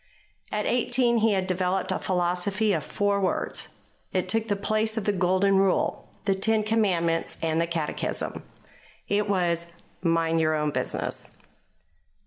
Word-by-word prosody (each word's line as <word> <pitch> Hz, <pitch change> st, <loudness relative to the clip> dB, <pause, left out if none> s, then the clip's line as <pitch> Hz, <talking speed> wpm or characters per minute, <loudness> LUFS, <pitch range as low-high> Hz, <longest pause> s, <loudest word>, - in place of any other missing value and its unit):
At 210 Hz, -, -1 dB
eighteen 245 Hz, 0 st, +2 dB
he 225 Hz, -1 st, +3 dB
had 190 Hz, -1 st, 0 dB
developed 185 Hz, 0 st, 0 dB
a -, -, 0 dB
philosophy 185 Hz, +4 st, +1 dB
of -, -, -1 dB
four 205 Hz, -1 st, 0 dB
words. 185 Hz, -, -1 dB, 0.4 s
It -, -, 0 dB
took 225 Hz, 0 st, 0 dB
the 205 Hz, -, +1 dB
place 215 Hz, +2 st, 0 dB
of 220 Hz, -, -1 dB
the 205 Hz, -, +2 dB
Golden 190 Hz, +1 st, +3 dB
Rule, 195 Hz, -1 st, +1 dB, 0.2 s
the 195 Hz, -, +3 dB
Ten 215 Hz, +3 st, +1 dB
Commandments, 185 Hz, -7 st, +1 dB
and 160 Hz, 0 st, +1 dB
the 170 Hz, -, 0 dB
Catechism. 165 Hz, -3 st, -3 dB, 0.7 s
It 205 Hz, 0 st, +1 dB
was: 170 Hz, -3 st, +1 dB, 0.3 s
"Mind 165 Hz, -1 st, +2 dB
your 155 Hz, 0 st, +2 dB
own 150 Hz, -1 st, 0 dB
business." -, -, -3 dB
195 Hz, 145 wpm, -26 LUFS, 170-210 Hz, 0.7 s, he